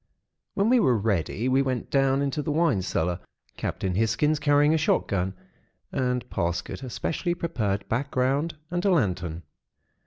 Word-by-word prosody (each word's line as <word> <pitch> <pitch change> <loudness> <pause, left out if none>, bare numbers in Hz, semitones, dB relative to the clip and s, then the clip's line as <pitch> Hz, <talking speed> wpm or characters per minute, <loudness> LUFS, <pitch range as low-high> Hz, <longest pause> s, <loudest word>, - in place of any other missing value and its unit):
"When 200 +1 +2
we 250 +1 +5
were 125 - +3
ready, 105 +2 0
we 130 +1 +3
went 130 -3 -2
down 135 0 +3
into 140 +1 -1
the 150 - -2
wine 150 - +2
cellar, 90 -1 -1 0.4
Captain 95 -1 -2
Hisgins 115 +9 +1
carrying 145 +1 +4
a - - +3
shot 155 - +2
gun, 95 -1 -1 0.6
and 125 -1 -1
Parsket 85 +4 -2
a 130 - -6
specially 175 +7 -2
prepared 110 - -2
background 135 +5 0 0.2
and 175 0 -1
a 200 - +3
lantern. 90 - 0
130 Hz, 155 wpm, -26 LUFS, 100-150 Hz, 0.6 s, we